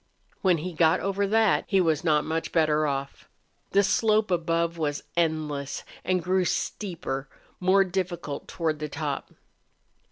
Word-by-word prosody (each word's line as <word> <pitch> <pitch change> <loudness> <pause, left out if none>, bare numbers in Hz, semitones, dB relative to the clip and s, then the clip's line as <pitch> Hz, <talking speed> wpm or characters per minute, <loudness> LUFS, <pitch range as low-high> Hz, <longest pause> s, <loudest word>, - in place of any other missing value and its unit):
When 185 -3 +4
he 175 +3 -5
got 165 +1 +4
over 195 0 0
that 220 0 +3
he 195 - +3
was 160 -5 +2
not 150 -3 +2
much 160 +1 -2
better 155 -2 +2
off. 140 -1 -4 0.4
The 200 +1 +4
slope 215 0 +2
above 170 -1 +1
was 145 -2 -1
endless 155 -4 -1 0.2
and 185 -2 0
grew 185 +1 +2
steeper, 165 -6 -3 0.3
more 190 +2 +4
difficult 175 -5 -4
toward 160 -3 -2
the 150 0 -4
top. 145 -1 -4
170 Hz, 140 wpm, -26 LUFS, 155-185 Hz, 0.4 s, When